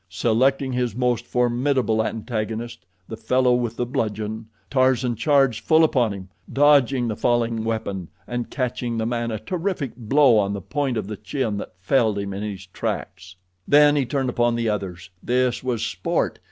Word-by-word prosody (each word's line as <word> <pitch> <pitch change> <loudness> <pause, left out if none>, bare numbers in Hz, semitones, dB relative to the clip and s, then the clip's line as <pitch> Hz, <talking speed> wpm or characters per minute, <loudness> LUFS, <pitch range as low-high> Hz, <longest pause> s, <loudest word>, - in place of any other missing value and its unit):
Selecting 130 +7 +1
his 125 -3 -1
most 125 -1 0
formidable 125 -2 +1
antagonist, 110 0 -4 0.2
the 110 - -6
fellow 125 +3 +2
with 120 -2 -1
the 120 - -1
bludgeon, 110 -3 -3 0.2
Tarzan 130 -2 +2
charged 135 -4 +2
full 160 0 +5
upon 125 -8 +2
him, 95 -2 -8 0.2
dodging 140 -3 +4
the 110 - -2
falling 115 -1 0
weapon, 110 -5 -3 0.2
and 120 -1 -4
catching 125 -2 -2
the 110 - -1
man 120 0 -1
a 110 - -2
terrific 165 - -3
blow 125 0 +4
on 100 -1 0
the 100 - -3
point 130 - -2
of 105 - -2
the 105 +1 -6
chin 110 0 -2
that 95 - -7
felled 110 +2 +1
him 100 -1 -3
in 100 - -5
his 100 -3 -5
tracks. 90 0 -5 0.3
Then 145 0 +6
he 140 -4 +1
turned 135 -1 -1
upon 120 0 +1
the 115 -1 0
others. 95 -3 -4
This 125 0 0
was 120 -3 -1
sport. 95 -5 -1
120 Hz, 170 wpm, -23 LUFS, 110-130 Hz, 0.3 s, Then